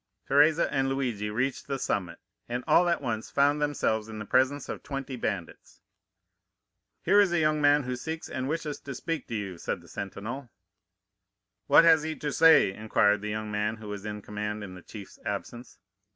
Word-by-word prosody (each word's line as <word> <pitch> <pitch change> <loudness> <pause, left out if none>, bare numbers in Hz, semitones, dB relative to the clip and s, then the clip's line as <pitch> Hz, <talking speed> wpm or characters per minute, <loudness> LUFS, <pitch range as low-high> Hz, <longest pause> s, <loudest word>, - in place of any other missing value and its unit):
"Teresa 150 +4 +4
and 135 -1 +1
Luigi 120 -6 -2
reached 125 +5 -2
the 140 -1 -2
summit, 90 -9 -2 0.3
and 120 +1 -3
all 175 0 +4
at 170 -4 0
once 110 -3 -3
found 145 +1 +2
themselves 110 -7 0
in 110 - -7
the 105 - -6
presence 130 +6 +1
of - - -6
twenty 135 -1 -5
bandits. 100 -8 -5 1.2
"'Here 200 +4 +5
is 195 -3 +2
a 175 - +2
young 155 -1 +2
man 145 0 +4
who 125 0 -3
seeks 160 +6 -5
and 130 +1 -4
wishes 155 -2 -3
to 140 -2 -7
speak 165 +1 -4
to 115 - -4
you,' 100 -5 -5
said - - -3
the - - -18
sentinel. 115 +7 -6 1.2
"'What - - +7
has 165 -2 +6
he 155 0 -3
to 150 -1 -4
say?' 160 -11 +6
inquired 105 -1 +2
the 105 - -4
young 110 0 -4
man 105 +1 -1
who 110 -2 -10
was 100 -1 -6
in 105 -1 -6
command 105 0 -4
in 95 -2 -8
the 90 - -11
chief's 100 +2 -11
absence. 120 +1 -6
125 Hz, 190 wpm, -28 LUFS, 105-145 Hz, 1.2 s, What